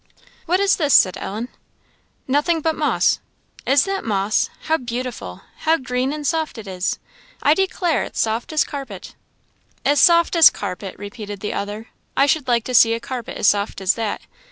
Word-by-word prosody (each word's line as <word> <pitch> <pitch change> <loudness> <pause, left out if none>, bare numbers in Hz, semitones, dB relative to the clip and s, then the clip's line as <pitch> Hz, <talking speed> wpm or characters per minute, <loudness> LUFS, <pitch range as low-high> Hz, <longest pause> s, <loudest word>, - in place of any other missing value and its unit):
"What 360 +3 +2
is 400 0 +3
this?" 295 -4 +3
said 185 -1 +5
Ellen. 220 +5 -5 0.8
"Nothing 295 +5 +1
but 320 +1 0
moss." - - +1 0.5
"Is 270 +1 +4
that 390 0 -3
moss! 205 -1 0
How 320 +1 +1
beautiful! 250 -1 -6 0.2
how 320 +1 +2
green 255 -1 -2
and 300 0 -5
soft 320 -3 -1
it 220 - -8
is! 185 -1 -2 0.5
I 295 - +5
declare 365 -2 0
it's - - -9
as - - +3
soft 225 +4 -3
as 310 - +3
a - - -11
carpet." 265 -10 -8 0.7
"As 290 0 +4
soft 340 0 +5
as 330 -2 +9
a - - -19
carpet!" 185 +1 -6
repeated 205 -1 -8
the 210 - -3
other. 205 +3 -5 0.3
"I 275 - +5
should 285 -1 +1
like 235 -2 +2
to 255 - -5
see 230 -1 +6
a - - -4
carpet 240 0 -6
as - - -2
soft 205 0 -1
as 190 0 +2
that! 225 -3 -3
250 Hz, 190 wpm, -21 LUFS, 210-310 Hz, 0.8 s, as